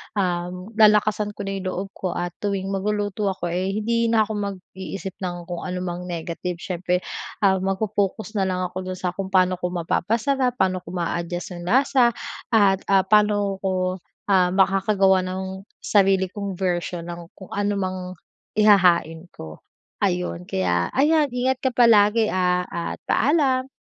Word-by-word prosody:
um, 180 0 -2
lalakasan 210 -1 +4
ko - - -5
na 195 0 -3
yung 185 - -5
loob 185 +1 -3
ko 185 -3 -4
at 175 0 -2
tuwing 195 -1 -2
magluluto 205 +1 -1
ako, 185 -3 -2
eh, 185 +3 -1
hindi 230 +2 +1
na 225 -1 +4
ako 215 - -6
mag-iisip 195 -1 -6
nang 175 -2 -4
kung 175 0 -6
anumang 180 0 -4
negative. 175 +1 -4
Siyempre, 180 +1 -2 0.4
ah, 190 -1 +4
magfo-focus 200 +2 -1
na 190 - +1
lang 185 -1 -1
ako 185 - -5
do'n 185 0 -5
sa 180 - -1
kung 195 +1 -5
paano 185 -1 +2
ko 180 - -1
mapapasarap. 230 +9 0
Paano 185 -5 +1
ko 180 - -29
maa-adjust 175 +1 -3
yung 175 - -8
lasa 250 +1 +3 0.3
at, 200 -4 +4
ah, 195 -1 +4
paano 205 -1 +2
ko, 185 -1 -1 0.3
ah, 180 -1 +3
makakagawa 195 0 +3
ng 190 +1 -5 0.2
sarili 190 -2 +3
kong 200 -2 -5
version 175 -2 -2
ng 170 0 -8
kung 190 - -13
anumang 185 -3 -2 0.4
ihahain 180 -5 +4
ko. 80 -1 -9 0.4
Ayun, 90 0 -1
kaya 90 -2 0
ayan 300 +3 +4
ingat 255 +1 +1
ka 260 0 -1
palagi, 225 -2 +5
ah, 180 -1 +1
at 170 0 -5
paalam. 265 -2 +2
190 Hz, 155 wpm, -23 LUFS, 180-210 Hz, 0.4 s, palagi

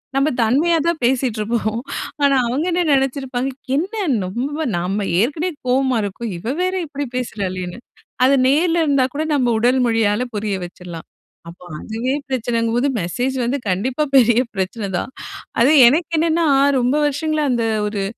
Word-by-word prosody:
நம்ம 275 +2 +2
தன்மையா 290 +10 +3
தான் 340 -2 0
பேசிகிட்டு 245 -3 0
இருப்போம். 220 0 -1 0.4
ஆனா 280 -1 +4
அவங்க 265 +7 -1
என்ன 350 +1 +1
நினைச்சிருப்பாங்க, 265 -1 -1 0.3
"என்ன 360 +9 -1 0.3
ரொம்ப 255 +10 -3 0.2
நம்ம 195 +4 -2 0.2
ஏற்கனவே 305 +9 -1 0.2
கோவமா 260 0 +2
இருக்கோம். 205 +3 -5
இவ 225 +9 -3
வேற 370 +1 0
இப்படி 285 0 -4
பேசுறாளேன்னு". 185 -6 -4 0.5
அத 270 - +4
நேரில 330 +4 +2
இருந்தா 280 -3 +3
கூட 305 - -1
நம்ம 245 -4 +2
உடல் 250 +3 +3
மொழியால 225 0 +1
புரிய 205 -1 -2
வச்சிடலாம். 175 -2 -10 0.4
அப்போ, 175 +1 -14 0.2
அதுவே 230 +4 -3 0.2
பிரச்சனைங்கும்போது 240 0 0
மெசேஜ் 245 +10 -2
வந்து 255 +4 0
கண்டிப்பா 245 +11 0
பெரிய 240 -2 +5
பிரச்சனை 195 +2 -3
தான். - - -4 0.5
அது 250 +5 +5 0.2
எனக்கு 320 +7 +1
என்னன்னா, 330 +1 +2 0.3
ரொம்ப 250 +3 +1
வருஷங்களா 310 +2 -1
அந்த 235 -1 0 0.2
ஒரு 205 -1 -3
250 Hz, 145 wpm, -19 LUFS, 220-285 Hz, 0.5 s, பெரிய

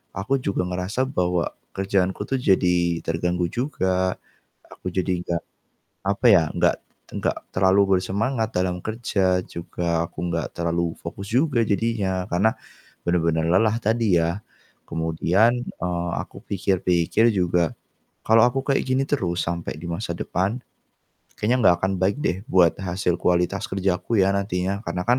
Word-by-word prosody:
aku 100 +8 0
juga 100 -7 -1
ngerasa 90 +7 -1
bahwa 90 -7 0 0.3
kerjaanku 95 0 0
tuh 135 - 0
jadi 90 -6 +2
terganggu 85 +1 0
juga, 95 -8 0 0.6
aku - - -6
jadi 90 -1 -1
nggak 85 -2 -2 0.6
apa 100 +5 +1
ya, 90 -6 +6
nggak - - +2 0.4
nggak - - -1 0.2
terlalu 95 +1 +4
bersemangat 110 +5 -1
dalam 90 0 0
kerja, 100 -5 +1
juga 85 0 -2
aku - - -24
nggak 85 -4 -3
terlalu 85 0 0
fokus 100 0 -7
juga 130 0 +2
jadinya, 100 -4 0
karena 95 +6 +3 0.6
bener-bener 85 -2 +1
lelah 105 +5 +4
tadi 110 -3 +2
ya. 85 +4 -1 0.5
Kemudian, 80 +7 +2
eee, 85 -1 -3
aku - - -11
pikir-pikir 95 +1 +2
juga 90 -3 +1 0.5
kalau 110 0 +6
aku 130 +2 0
kayak 140 - +2
gini 130 +1 +1
terus 90 -11 0
sampai 85 0 -3
di 85 - -7
masa 85 +2 -3
depan, 95 +9 -1 0.8
kayaknya 120 +5 +1
nggak 85 - +6
akan 95 +1 +1
baik 95 +5 +2
deh 90 - +1
buat 90 -3 +4
hasil 90 -1 -1
kualitas 90 -1 +1
kerjaku 95 +3 0
ya, 95 - +3
nantinya. 100 0 -1
Karena 90 - -3
kan 125 +1 +5
95 Hz, 140 wpm, -23 LUFS, 85-105 Hz, 0.8 s, ya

